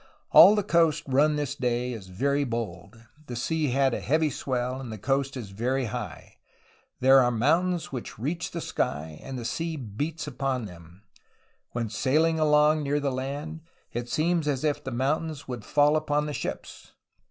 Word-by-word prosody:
All 205 - +9
the 210 - +1
coast 170 -5 +2
run 145 +3 +3
this 145 -2 -2
day 125 -2 -1
is 105 -5 -8
very 140 +10 0
bold; 115 -4 -5 0.2
the 120 - -5
sea 155 +5 -1
has 135 0 +2
a - - -1
heavy 155 +2 +1
swell 130 0 -2
and 125 -4 -7
the 110 - -6
coast 135 +5 -1
is 110 -6 -7
very 125 +6 -1
high. 110 -5 -7 0.6
There 135 +1 +7
are 125 -2 +4
mountains 165 +9 +1
which 125 -3 -6
reach 155 +10 -3
the 170 - -5
sky, 75 - -3
and 135 -1 -6
the 120 - -6
sea 165 +7 -2
beats 145 +6 -4
upon 130 -3 -2
them. 90 0 -13 0.7
When 120 -1 -2
sailing 155 +9 +1
along 150 0 +4
near 145 0 0
the 140 -1 -1
land, 145 +5 -5 0.3
it 120 +1 -4
seems 165 +1 +1
as 140 -2 -1
if 150 -1 0
the - - -4
mountains 145 +4 -2
would 125 -4 -5
fall 145 +1 +3
upon 150 -1 0
the 150 - -4
ships. - - -6
135 Hz, 175 wpm, -27 LUFS, 120-150 Hz, 0.7 s, All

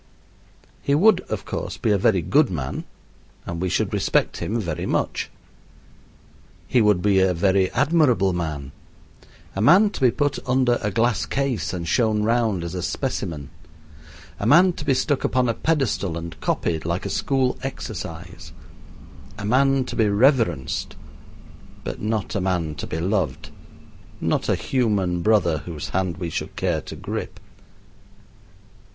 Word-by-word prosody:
He 140 - +1
would, 190 +4 +5
of 110 -3 -3
course, - - -4
be 110 - 0
a 100 - +4
very 95 -2 +2
good 145 - +3
man, 70 -7 -4 0.6
and 85 0 -5
we 95 - 0
should 90 - 0
respect - - +1
him 115 +3 -2
very 85 -7 -3
much. - - -1 1.4
He 125 - +3
would 105 -4 +3
be 100 -2 +4
a 95 -1 +3
very 95 +1 +2
admirable 130 - +2
man 75 -6 -4 0.8
a 100 - -1
man 185 - +6
to - - -8
be 130 - +6
put 145 +3 -1
under 125 -2 +3
a 105 - 0
glass 115 +3 +1
case 135 - -1
and 85 -2 -4
shown 110 +1 +2
round 110 -5 +1
as 85 - -5
a 90 - -3
specimen 75 -4 -3 0.9
a 100 - -1
man 175 +7 +6
to - - -7
be 135 - +3
stuck 130 +2 0
upon 130 -1 +1
a 115 - +1
pedestal 125 - 0
and 85 0 -8
copied, 80 -2 -1
like 85 +2 -2
a - - -1
school 130 -2 0
exercise 90 -10 -7 0.8
a 100 - -5
man 135 +3 +3
to - - -6
be 110 -3 +3
reverenced, 100 - +1 0.9
but - - -5
not 110 0 -2
a 100 - -1
man 90 -4 -1
to - - -6
be 80 - -4
loved, 90 -5 -1 0.7
not - - 0
a - - +3
human 100 -9 0
brother 85 -7 +3
whose 80 -2 -7
hand 95 -2 -1
we 85 -2 -4
should - - -4
care - - 0
to - - -9
grip. - - -5
105 Hz, 155 wpm, -23 LUFS, 85-125 Hz, 1.4 s, man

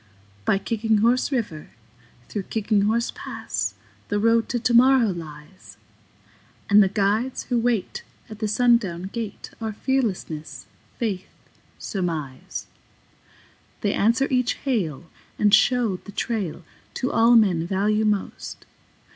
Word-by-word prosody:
By - - +3
Kicking 220 +2 0
Horse 240 +6 +2
River, 205 - -3 0.6
through 205 -3 -5
Kicking 215 -2 +1
Horse 230 +2 +1
Pass, - - -4 0.3
The 205 - 0
Road 230 +1 +2
to 240 - 0
Tomorrow 245 0 +5
lies; 160 0 -9 0.9
And 205 +1 +8
the 195 - +4
guides 210 +6 0
who 245 -2 0
wait 230 -4 -1 0.3
at 215 -2 -10
the 215 - -1
sundown 215 -6 +2
gate 225 -4 -6
Are 220 -1 -3
Fearlessness, 180 - -2 0.3
Faith, 195 -5 -2 0.5
Surmise. 160 -9 -4 1.2
They - - +1
answer 235 +6 +2
each 250 -1 +2
hail 175 - -1 0.3
and 205 -1 +3
show 230 -3 +4
the 205 - -12
trail 200 -5 -3 0.3
To 255 - -1
all 230 +1 +5
men 180 -7 +3
value 210 +3 +1
most. 210 -2 -2
215 Hz, 120 wpm, -24 LUFS, 190-235 Hz, 1.2 s, And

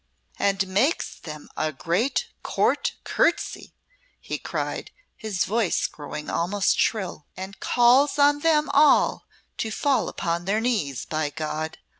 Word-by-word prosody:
"And 195 -1 +1
makes 210 - +1
them 150 -2 -9
a 155 0 -1
great 200 - -1
Court - - 0
courtesy," 340 - 0 0.4
he - - -5
cried, - - -4 0.3
his 215 -5 -2
voice 215 -3 +1
growing 150 0 -6
almost 195 +4 +1
shrill, 185 -8 -1
"and 190 +1 -7
calls 255 +5 +4
on 290 0 +4
them 305 -1 +3
all 295 +1 +4 0.3
to 220 - -1
fall 275 +5 +1
upon 170 +1 -2
their 205 +3 +1
knees, 210 - -1
by 155 -1 -1
God! 155 +1 -4
200 Hz, 130 wpm, -25 LUFS, 160-255 Hz, 0.4 s, calls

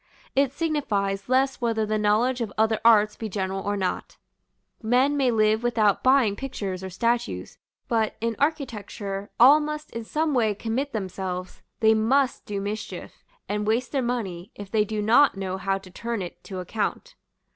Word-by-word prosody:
It 275 -1 +3
signifies 210 -11 -1
less 265 +1 +2
whether 225 -2 +1
the 215 0 -1
knowledge 230 +5 +2
of 220 -3 -2
other 220 0 +2
arts 215 -2 +5
be 220 - -5
general 195 -1 -2
or 205 +1 -2
not; 185 -2 -3 0.6
men 250 +5 +2
may 270 -3 +2
live 215 -1 +3
without 220 -4 +2
buying 255 -6 +4
pictures 200 -8 -5
or 190 - -5
statues: 235 +5 -2 0.3
but, 225 -4 0
in 230 0 -1
architecture, 210 -9 -3
all 275 +6 +8
must 300 0 -5
in 230 - -5
some 305 +6 -1
way 220 -5 +2
commit 240 +7 -2
themselves; 185 -3 -5 0.2
they 220 0 +6
must 255 +5 +1
do 205 -1 -3
mischief, 205 +2 -6 0.2
and 210 0 -2
waste 230 +3 0
their 275 - 0
money, 205 -8 -3
if 205 -1 -9
they 215 -2 +2
do 215 0 -3
not 235 +2 +5
know 190 -1 -3
how 195 0 0
to 190 -1 -13
turn 230 +1 -3
it 175 - -9
to 190 - -7
account. 220 - -3
220 Hz, 170 wpm, -25 LUFS, 200-250 Hz, 0.6 s, all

